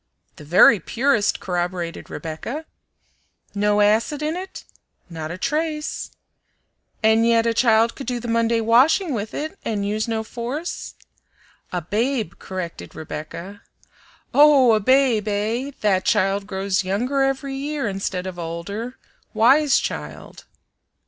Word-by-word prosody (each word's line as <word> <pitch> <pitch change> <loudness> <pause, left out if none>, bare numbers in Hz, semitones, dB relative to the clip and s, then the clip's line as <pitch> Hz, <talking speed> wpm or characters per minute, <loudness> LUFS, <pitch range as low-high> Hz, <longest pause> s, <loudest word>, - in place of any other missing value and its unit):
"The - - -11
very 185 +6 +6
purest," 230 - +1
corroborated 175 -1 -3
Rebecca. 225 - -6 0.9
"No 210 0 +2
acid 225 +8 +2
in 310 +2 -1
it?" 375 +1 -7 0.5
"Not 160 -1 -5
a 175 - -5
trace." 305 - -2 0.9
"And 220 +1 +4
yet 230 0 +3
a 230 - +2
child 230 -1 +3
could 270 - -8
do 245 -1 -2
the 240 - -7
Monday 230 0 +1
washing 270 - +4
with 220 -2 -4
it 310 +6 -5
and 205 -3 -2
use 215 +2 -1
no 225 -1 -1
force." 245 +9 -5 0.8
"A 180 -2 -3
babe," 225 - -1
corrected 170 - -7
Rebecca 170 +6 -7 0.7
"Oh! 285 -5 +6
a 215 - +3
babe, 250 -1 +3
eh? 220 +6 -1
That 190 -3 +2
child 195 +1 +1
grows 195 0 -1
younger 245 +9 0
every 270 0 -1
year, 280 -1 -3
instead 190 -2 -3
of 185 -2 -6
older 200 +9 -5 0.4
wise 270 +6 +5
child!" - - -6
225 Hz, 130 wpm, -22 LUFS, 195-270 Hz, 0.9 s, very